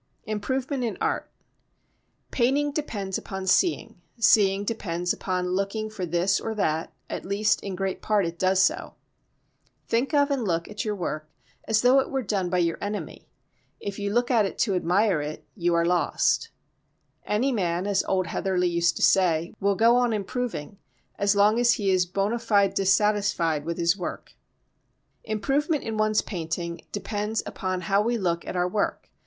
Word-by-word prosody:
Improvement 260 +5 -2
in 230 - -2
Art - - -1 1.0
Painting 275 +4 +2
depends 205 -11 -3
upon 190 -1 -6
seeing; 195 - +1 0.2
seeing 200 -3 +4
depends 180 -5 -2
upon 180 -1 -2
looking 200 +3 -2
for 190 -5 -4
this 175 +4 +1
or 225 - -4
that, 160 -6 -1 0.2
at - - -5
least 205 +2 +1
in 195 -2 -5
great 190 0 -3
part 210 -3 +2
it 170 0 -5
does 185 0 +2
so. 325 - +1 0.9
Think 235 +4 0
of 285 0 +3
and 270 -4 0
look 170 -4 -1
at 210 0 -4
your 210 -1 -2
work 155 -4 -4 0.4
as 220 +1 +2
though 255 +2 +6
it 265 - -1
were 270 -1 -2
done 195 -3 -1
by 180 - 0
your 170 -2 0
enemy. 205 +1 -5 0.5
If 200 0 -5
you 200 0 -2
look 240 +3 +1
at 230 -3 +4
it 195 - -3
to 205 - +2
admire 180 0 +2
it 150 +1 -6
you 175 -3 0
are 170 0 +2
lost. 180 - +1 0.8
Any 240 +6 +1
man, 180 -5 -1
as 200 -1 +1
old 185 -1 +1
Heatherley 180 0 0
used 170 0 +1
to - - -2
say, 170 -3 +3
will 200 0 +2
go 230 +4 +5
on 245 -2 +2
improving 205 -4 -4 0.4
as 200 0 +2
long 210 +3 +4
as 240 0 +5
he 200 -3 0
is 180 -1 +2
bona 200 +5 -1
fide 205 -4 +2
dissatisfied 195 -5 +1
with 170 0 -3
his 170 0 +2
work. 180 -3 -6 0.9
Improvement 275 - 0
in 225 - -4
one's 215 0 +2
painting 170 -2 -5
depends 210 +1 -2
upon 185 -1 -3
how 195 +3 +2
we 235 +2 0
look 170 -4 -1
at - - -4
our 180 0 +1
work. 200 +3 -2
200 Hz, 170 wpm, -26 LUFS, 180-220 Hz, 1.0 s, though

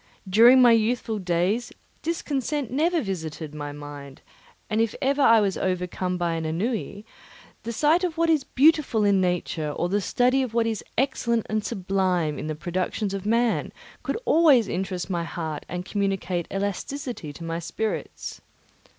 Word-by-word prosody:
During 235 +7 +7
my 240 - +7
youthful 225 -1 +1
days 185 +6 0 0.3
discontent 290 -5 -2
never 320 +4 +1
visited 160 -6 -5
my 145 -1 -5
mind, 145 -2 -10 0.4
and 215 +1 +1
if 225 -2 0
I 270 -4 +5
was 195 -2 0
ever - - 0
overcome 180 0 -2
by 170 -1 -1
ennui, 200 +6 -3 0.6
the 230 - -5
sight 305 +9 +2
of 345 -3 -2
what 335 0 +2
is 315 -4 +3
beautiful 285 -6 +3
in 200 -2 +4
nature 175 -4 -1
or 175 +4 -2
the 205 +2 +1
study 250 +6 +2
of 245 -3 -3
what 230 -1 +3
is 225 -2 -2
excellent 235 -3 +1
and 215 -1 0
sublime 185 -7 0
in - - -5
the 155 - -3
productions 185 +5 -2
of 195 +1 -4
man 230 +1 +1 0.3
could - - -2
always 295 -9 +5
interest 185 0 -3
my 175 -3 -2
heart 160 -3 -5
and 180 0 -4
communicate 190 -4 -1
elasticity 200 - -4
to 165 - -10
my 165 0 -3
spirits. 215 +6 -4
200 Hz, 160 wpm, -25 LUFS, 175-245 Hz, 0.6 s, During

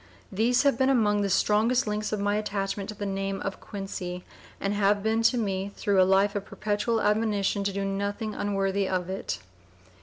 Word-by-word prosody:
These 230 +6 +2
have 280 -4 +2
been 265 0 +4
among 210 -6 +3
the 200 - 0
strongest 220 +7 +3
links 210 0 -2
of 215 - -1
my 205 +1 +1
attachment 200 -1 -3
to 215 - -6
the 205 - -4
name 195 0 -2
of 195 - -4
Quincy, 180 -3 -6 0.4
and 200 +1 -1
have 205 0 +2
been 220 +1 +1
to 235 +2 +3
me 195 -3 -2
through 195 -2 +3
life 195 +2 +3
a 205 - 0
perpetual 210 +3 -1
admonition 210 -2 +1
to 200 - +1
do 195 0 -2
nothing 200 +2 -2
unworthy 195 -1 0
of 185 -1 -1
it." 190 - -3
205 Hz, 185 wpm, -27 LUFS, 195-215 Hz, 0.4 s, been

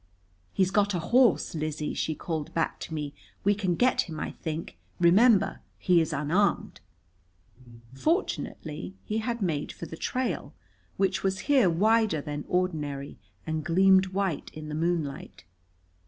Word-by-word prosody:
"He's 190 -1 +1
got 205 -1 +2
a - - 0
horse, 235 +4 +3
Lizzie," 155 -1 -3
she 155 - -2
called 155 -1 -4
back 165 - 0
to - - -7
me. 145 -2 -4 0.3
"We 205 - +4
can 190 -4 -1
get 250 -4 +2
him, 155 -1 -6
I - - -3
think. 160 0 -6 0.2
Remember, 195 +4 +5 0.2
he 175 -2 +3
is 160 - -1
unarmed." 155 +8 0 1.1
Fortunately 170 - -2
he 215 +1 -1
had 230 -1 -2
made 155 -5 -1
for - - -8
the 160 - -8
trail, 255 +9 -3 0.4
which 195 -1 +1
was 190 0 -1
here 255 -10 +5
wider 215 +1 +3
than 145 0 -5
ordinary 150 -6 -2 0.3
and 160 -1 -2
gleamed 190 +3 +5
white 190 -4 -2
in 155 0 -7
the - - -5
moonlight. 160 - -2
175 Hz, 145 wpm, -28 LUFS, 155-200 Hz, 1.1 s, Remember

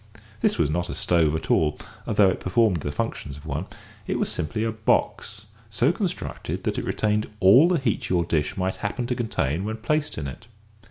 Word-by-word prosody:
This - - +1
was 75 -3 +2
not 85 +2 -1
a - - -4
stove 80 -3 +2
at 80 - -3
all, 75 -2 +2 0.3
though 105 -4 +4
it - - -4
performed 95 0 +2
the 70 -2 -4
functions 70 0 -4
of 75 - -13
one. 80 - -3 0.4
It - - 0
was - - -1
simply 80 +8 -2
a 115 - 0
box, 110 -1 -1 0.2
so 120 +7 +2
constructed 190 -1 -4
that - - -1
it - - -4
retained 105 0 0
all 100 - +7
the 180 -1 +2
heat 130 -7 -1
your 85 -2 +2
dish 75 -3 -1
might 95 0 -1
happen 110 +4 -3
to 125 +1 -1
contain 90 - -1
when 110 +2 -3
placed 145 +7 -1
in 75 - -3
it. 70 +10 -8
100 Hz, 205 wpm, -25 LUFS, 80-115 Hz, 0.4 s, all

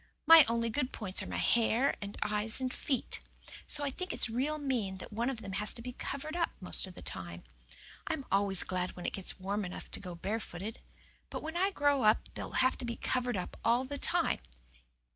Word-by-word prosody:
My 325 -1 +11
only 230 0 +1
good 255 +2 0
points 190 -3 -1
are - - -5
my - - -4
hair 235 +3 +3
and 200 0 -6
eyes 210 +2 +1
and 255 -1 -1
feet. 265 -4 -1 0.5
So 290 - +4
I 280 - 0
think 365 +7 -4
it's 225 - 0
real 275 +6 0
mean 245 -10 -1
that 190 - -9
one 235 +4 0
of 235 -4 -4
them 195 - -5
has 205 +2 +1
to 235 - -8
be 250 0 -5
covered 310 +6 -4
up 340 -1 +2
the 185 - -10
most 185 - -1
of 185 - -11
the - - -10
time. 85 -2 -6 0.6
I'm 280 -4 -2
always 195 -1 +3
glad 185 0 -2
when 180 - -7
it - - -1
gets 190 -1 -4
warm 200 +2 -1
enough 180 -1 -7
to - - -3
go 180 -2 -7
barefooted. 205 +2 -4 0.5
But, - - -5
when 320 +2 -4
I 375 +3 +3
grow 290 -7 +2
up 215 -1 +3
they'll - - -6
have 260 - +2
to 240 -2 -3
covered 250 -3 0 0.3
all 235 +2 +4
the 285 +1 -4
time. - - +1
230 Hz, 215 wpm, -33 LUFS, 200-270 Hz, 0.6 s, My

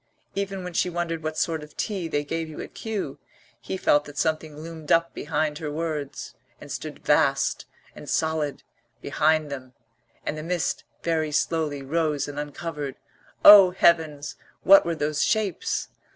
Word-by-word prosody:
Even 195 -1 -3
when 180 -1 -6
she 180 - +1
wondered 170 -2 -3
what 155 0 -4
sort 160 -2 0
of 150 0 -13
tea 195 -6 -2
they 145 -2 -1
gave 165 +2 -3
you 155 - -9
at - - -7
Kew, 220 -3 -4 0.4
he 190 - -5
felt 145 -5 +3
that 145 -1 -11
something 155 0 -1
loomed 160 -1 -7
up 165 0 +3
behind 150 0 -2
her 155 -3 -4
words, 155 -2 -4 0.3
and - - -11
stood - - -7
vast - - +2 0.3
and - - -10
solid 160 -3 -1 0.4
behind 155 0 +1
them; 130 -2 -7 0.5
and - - -2
the 155 - -5
mist 175 +1 -2 0.2
very 160 -2 0
slowly 150 -2 0
rose 150 0 0
and 145 0 -6
uncovered 145 -1 -5 0.5
O, 200 -3 +11
Heavens, 160 -5 +2 0.3
what 195 -2 +7
were 170 - 0
those 150 -1 0
shapes? 215 -6 0
160 Hz, 160 wpm, -25 LUFS, 150-170 Hz, 0.5 s, O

